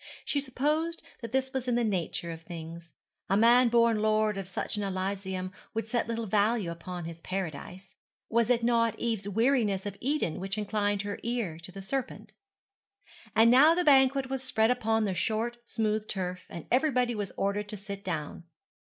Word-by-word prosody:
She 285 - 0
supposed 300 +5 -1 0.2
that 230 -2 -6
this 265 +1 0
was 260 -1 -2
in 245 - +2
the 240 - +2
nature 175 -4 -2
of 165 0 -8
things. 165 0 -9 0.3
A 195 - +3
man 240 +3 +6
born 230 -2 +3
lord 215 -1 +2
of 195 -1 -5
such 190 - -3
an 210 - -2
elysium 190 -1 -3 0.2
would 225 - -1
set 235 +1 -1
little 230 0 -2
value 210 -2 +1
upon 175 +1 -6
his 165 0 -8
paradise. 185 +1 -5 0.3
Was 230 0 +2
it 240 -2 +3
not 230 -1 +2
Eve's 220 -4 -2
weariness 220 -3 +2
of 205 -1 -4
Eden 270 - -1
which 195 +2 -3
inclined 205 -1 0
her 205 0 -4
ear 230 -9 -2
to 170 +2 -9
the 195 +1 -9
serpent? 265 +6 -4 1.0
And 225 +1 +6
now 295 +6 +7
the 360 - +1
banquet 270 -2 +5
was 265 0 -3
spread 230 -3 +2
upon 225 -3 +1
the 195 - -1
short 225 +5 -1
smooth 215 -1 -1
turf, 180 -2 -3
and 170 - -8
everybody 250 -2 +2
was 205 -3 -4
ordered 205 +1 -1
to 210 - -5
sit 200 0 -7
down. 160 -1 -4
215 Hz, 180 wpm, -29 LUFS, 190-240 Hz, 1.0 s, now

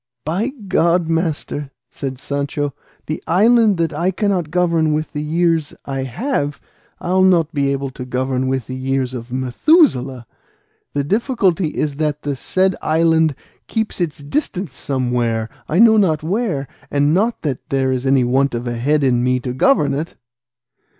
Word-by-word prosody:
"By 180 +9 0 0.2
God, 170 -1 +2
master," 160 -3 -2 0.2
said 135 -2 -5
Sancho, 140 +1 -3 0.3
"the 155 - -4
island 215 +3 +4
that 165 -1 0
I 170 +5 0
cannot 190 -4 0
govern 165 -2 +2
with 155 0 -2
the 150 - -3
years 165 0 0
I 135 -1 -3
have, 145 - -2 0.4
I'll 185 +2 +1
not 175 -3 +3
be 140 -2 +1
able 135 -1 -2
to 125 - -7
govern 130 +1 -1
with 130 -2 -1
the 130 - -6
years 130 0 -1
of 120 -1 -7
Methuselah; 130 - +2 0.7
the 145 - 0
difficulty 195 - +1
is 150 -2 -2
that 150 -1 -1
the 145 -1 -2
said 185 +7 0
island 160 -1 +2 0.3
keeps 220 -4 -2
its 165 -4 -1
distance 185 - -3
somewhere, 120 -4 -1 0.2
I 155 - 0
know 220 +1 +7
not 160 -7 +2
where; 175 - -1 0.2
and 145 +1 +2
not 220 +6 +1
that 140 -5 -3
there 135 -1 +1
is 130 -1 -1
any 135 -1 +3
want 130 +1 +1
of 120 +1 -4
head 130 +5 0
in 125 -2 +2
me 125 0 +2
to 125 0 -4
govern 145 - +3
it." 150 +4 -4
150 Hz, 160 wpm, -19 LUFS, 130-175 Hz, 0.7 s, know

